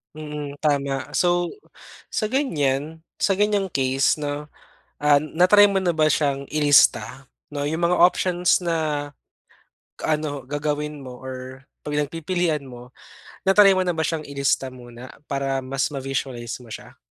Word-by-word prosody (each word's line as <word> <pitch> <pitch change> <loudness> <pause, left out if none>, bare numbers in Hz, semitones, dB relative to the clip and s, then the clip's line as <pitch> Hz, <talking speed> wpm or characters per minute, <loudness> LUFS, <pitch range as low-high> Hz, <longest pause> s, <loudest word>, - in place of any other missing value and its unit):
Mm, 150 -2 -6
tama. 140 -2 -1
So, 175 0 +1 0.6
sa - - -1
ganyan. 160 - -1 0.2
Sa 195 -1 +2
ganyang 205 -1 +1
case 135 -2 +1
'no, 145 0 -4 0.5
ah, 145 -1 +4
na-try 180 +7 +5
mo 195 - 0
na 185 -2 +1
ba 155 -1 +3
siyang 140 -2 0
ilista 145 -2 +3 0.3
'no, 145 - -3
yung 160 +3 -2
mga 180 +1 +2
options 180 0 +3
na 155 -4 -1 0.9
ano 150 -3 -1
gagawin 150 +1 -2
mo 125 -1 -8
or 130 0 -8 0.2
pag 150 - -3
nagpipilian 165 0 -1
mo 125 -1 -11 0.5
na-try 195 0 +6
mo 185 - +2
na 180 - 0
ba 160 - -4
siyang 165 -2 -2
ilista 140 -1 -1
muna 120 0 -11 0.2
para 135 -1 -1
mas 135 +2 -2
ma-visualize 130 -3 -4
mo 115 - -15
siya? - - -10
150 Hz, 140 wpm, -23 LUFS, 135-170 Hz, 0.9 s, na-try